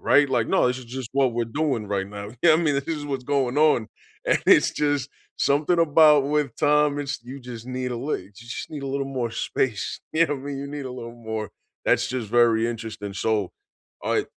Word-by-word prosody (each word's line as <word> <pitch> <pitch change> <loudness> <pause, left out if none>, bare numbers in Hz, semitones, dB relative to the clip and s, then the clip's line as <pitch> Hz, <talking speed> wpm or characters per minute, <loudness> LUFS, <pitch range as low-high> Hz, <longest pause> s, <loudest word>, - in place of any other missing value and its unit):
right? 145 -1 +4
Like, 120 -4 +1
no, - - +3
this 125 +1 0
is 130 - -10
just 125 0 -6
what 135 -2 +2
we're 120 0 0
doing 120 -3 -1
right 100 -1 -1
now. 100 0 -7
Yeah. 165 -2 +7
I - - +5
mean, 155 -4 +1
this 140 +2 -2
is 155 -3 -2
what's 135 -3 -3
going 140 -2 0
on, 150 -8 +4 0.4
and - - +3
it's - - +6
just 145 -2 0 0.3
something 150 +5 +2
about 150 -3 +6
with 145 -3 0
time, 150 -1 +3
it's 145 -1 -3
you 130 +3 -8
just 120 -2 -9
need 125 0 -3
a - - -3
lit 135 +6 -2
you 100 - -18
just 120 +4 -7
need 150 -2 -6
a 140 - -4
little 135 0 -2
more 125 -4 -2
space. 115 -1 -2
You 165 +1 +4
know 145 - -1
what 135 - -7
I - - -10
mean, 140 -1 -4
you 140 - -5
need 145 -1 -6
a 125 - -6
little 115 -2 -7
more 110 -2 -5 0.3
that's - - +3
just 125 -4 -3
very 115 0 +4
interesting, 110 -3 -6
so, 105 -2 0 0.5
I - - +1
130 Hz, 230 wpm, -24 LUFS, 115-145 Hz, 0.5 s, Yeah